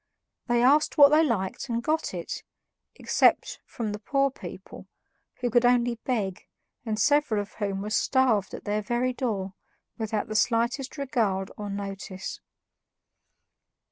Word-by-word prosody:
They 240 0 +2
asked 290 +4 +4
what 285 -1 +9
they 305 +2 +5
liked 220 -4 -2
and 235 0 -1
got 315 +3 0
it, - - -5 0.5
except - - +2
from 225 -4 -4
the 210 - -5
poor 275 +5 +1
people, - - -10 0.5
who 245 -1 0
could 240 +1 +4
only 245 -1 +3
beg, 205 -8 -2 0.4
and 220 -2 -2
several 290 -7 +3
of 205 0 -6
whom 200 -2 -3
were 210 - -5
starved 240 -4 +2
at - - -10
their 210 0 -1
very 240 +3 -1
door 205 -7 -3 0.5
without 220 -1 -2
the 215 - -5
slightest 240 +6 +1
regard 220 -9 -1
or 205 -1 -6
notice. 195 -1 -6
230 Hz, 140 wpm, -27 LUFS, 205-255 Hz, 0.5 s, what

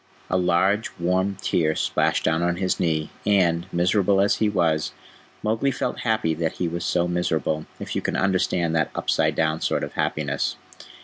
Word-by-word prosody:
A - - +2
large, 95 +4 +2
warm 95 +3 0
tear 80 -2 +1
splashed - - +1
down 80 +1 +1
on 85 0 +1
his 95 0 -1
knee, 80 -2 0
and, 90 -4 +2
miserable 95 +3 +2
as 100 +1 +3
he 110 - +2
was, 80 -6 +1 0.5
Mowgli 110 +5 +1
felt 135 - -2
happy 110 -8 +1
that 80 0 -2
he 90 - -2
was 85 +1 -4
so 90 -1 +1
miserable, 80 -3 -1
if - - -5
you - - 0
can - - -2
understand 90 -3 +1
that 80 - +1
upside - - +1
down 80 0 0
sort - - 0
of - - -5
happiness. 70 -2 -1
90 Hz, 175 wpm, -24 LUFS, 80-95 Hz, 0.5 s, as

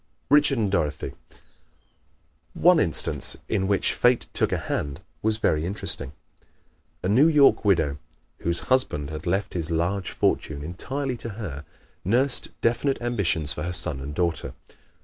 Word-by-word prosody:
Richard 145 -2 +5
and 105 -4 0
Dorothy 75 -7 -1 0.2
¶ - - -24 1.2
One 175 0 +5
instance 80 - +1
in 95 -3 0
which 100 -1 +1
Fate 125 -1 +2
took - - +1
a - - +1
hand 70 -1 -3 0.2
was 110 0 +3
very 80 -8 +1
interesting. 85 -7 +1 0.9
A - - 0
New 125 +10 +5
York 150 -4 +5
widow, 80 -8 +2 0.4
whose 85 0 -1
husband 75 - 0
had 75 +4 -6
left 95 +4 -1
his 85 -2 -2
large 85 +3 -1
fortune 70 -1 -1
entirely 130 - -3
to 115 - -7
her, 75 -10 -6 0.4
nursed 125 +7 +1
definite 120 +4 +1
ambitions 95 -11 0
for - - -6
her 90 0 -3
son 80 -5 -2
and 70 +2 -6
daughter. 85 -1 -1
95 Hz, 150 wpm, -25 LUFS, 80-120 Hz, 1.2 s, Richard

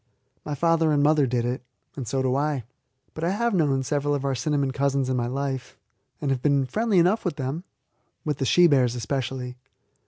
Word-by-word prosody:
My 150 - -4
father 165 0 +2
and 145 -1 +3
mother 150 -2 +4
did 120 -1 0
it, 125 +2 -2 0.3
and 130 -5 -5
so 135 +3 0
do 130 0 +1
I. 145 -2 0 0.5
But 155 - -6
I 170 - +2
have 235 +4 0
known 145 -7 +2
several 145 +2 0
of 140 -1 -3
our 135 - +1
cinnamon 140 +2 0
cousins 140 -1 0
in 130 - +1
my 120 -1 0
life, 135 0 -4 0.4
and 140 - -1
have 130 -2 -1
been 140 -2 +2
friendly 215 - 0
enough 180 +6 +3
with 180 -5 -2
them 145 +6 -4 0.6
with 150 -3 -1
the 135 - 0
she 175 +7 +5
bears 130 -6 +3
especially. 125 +1 -3
140 Hz, 205 wpm, -25 LUFS, 130-155 Hz, 0.6 s, she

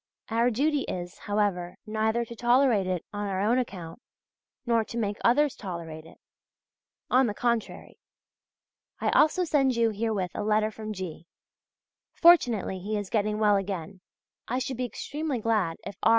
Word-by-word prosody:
Our 230 +2 +2
duty 285 +5 +1
is, 175 -1 -5
however, 200 -4 -1
neither 220 +2 0
to 235 - -9
tolerate 240 -4 +3
it 180 -2 -2
on 205 0 -3
our 190 -1 -2
own 225 +6 +2
account, 185 -4 -6 0.6
nor 230 -2 +2
to 230 - -7
make 205 -2 -1
others 285 +4 +3
tolerate 165 -5 -7
it; - - -16 0.9
on 255 0 +5
the 210 - -3
contrary. 235 -1 -2 1.0
I - - +1
also 335 +4 +4
send 275 -6 +2
you 230 -1 +2
herewith 210 -4 -2
a - - -3
letter 215 +1 +1
from 215 0 -7
G.; 180 -4 -7 0.9
fortunately 245 - +4
he 210 +3 -3
is 205 -2 -5
getting 210 -1 +1
well 210 -1 +4
again. 190 -1 -5 0.5
I 250 - -1
should 260 -1 -3
be 250 - -1
extremely 290 +3 -4
glad 215 -7 0
if 200 - -6
R. - - +4
215 Hz, 160 wpm, -27 LUFS, 195-240 Hz, 1.0 s, on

